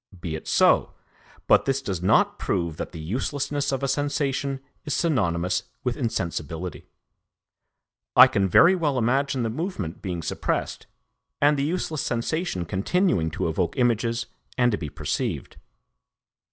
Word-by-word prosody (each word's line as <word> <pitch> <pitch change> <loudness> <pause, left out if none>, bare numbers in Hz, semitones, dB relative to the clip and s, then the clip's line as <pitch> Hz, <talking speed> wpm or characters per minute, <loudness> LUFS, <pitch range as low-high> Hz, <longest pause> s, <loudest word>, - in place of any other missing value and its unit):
Be 85 -3 -4
it 80 - -8
so; - - +3 0.5
but - - +4
this 135 0 +1
does 95 -10 -4
not 90 - +3
prove 85 -4 -1
that - - -5
the 85 - -8
uselessness 140 - -2
of 135 0 -2
a - - +1
sensation 140 -1 -1 0.2
is 150 - -2
synonymous 90 - +1 0.2
with 125 -2 -1
insensibility. 85 - -3 1.3
I - - +11
can 95 -1 +1
very 170 - +7
well 155 -7 0
imagine 130 +2 +1
the 115 - -1
movement 115 - -4
being 90 -4 -4
suppressed - - -2 0.5
and 145 +1 +4
the 140 - -1
useless 155 -1 -1
sensation 120 - -2
continuing 95 - +1
to 80 - -2
evoke 85 +1 -1
images 120 -1 +1 0.3
and 125 -1 +4
to 105 - 0
be 75 - -4
perceived. - - -3
120 Hz, 140 wpm, -25 LUFS, 90-140 Hz, 1.3 s, I